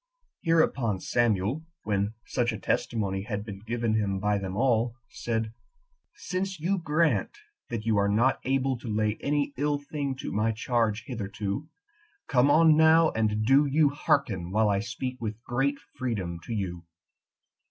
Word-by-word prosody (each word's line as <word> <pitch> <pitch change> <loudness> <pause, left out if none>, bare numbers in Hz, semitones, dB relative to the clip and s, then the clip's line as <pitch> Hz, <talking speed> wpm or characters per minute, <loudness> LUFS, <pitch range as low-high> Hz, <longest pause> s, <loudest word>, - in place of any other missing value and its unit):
6. - - -30
Hereupon 135 - +2
Samuel, 120 - +1 0.2
when 100 +1 -1
such 120 -1 0
a 110 - -4
testimony 100 -2 -1
had 105 0 -4
been 100 -3 -7
given 115 +1 -1
him 100 -3 0
by 105 +1 +1
them 95 0 -5
all, 120 -1 +2
said, 115 -1 -3 0.6
"Since 190 -1 -3
you 185 +5 0
grant 165 - +1 0.3
that 115 -2 -4
you 110 -2 +2
are 100 0 +3
not 120 +6 +2
able 135 -1 0
to 120 - -9
lay 105 0 0
any 145 0 0
ill 145 +1 +1
thing 145 -1 -4
to 130 - -6
my 110 +2 +1
charge 115 -1 0
hitherto, 105 +3 -4 0.6
come 130 0 +4
on 160 +1 +6
now, 160 +1 +6
and 110 -1 0
do 140 +4 +5
you 145 +1 +4
hearken 130 - 0
while 105 +2 +2
I 100 -1 +2
speak 125 +3 -5
with 110 -1 -4
great 135 +4 0 0.2
freedom 95 -9 -3
to - - -7
you. 90 -4 -3
115 Hz, 160 wpm, -27 LUFS, 105-140 Hz, 0.6 s, on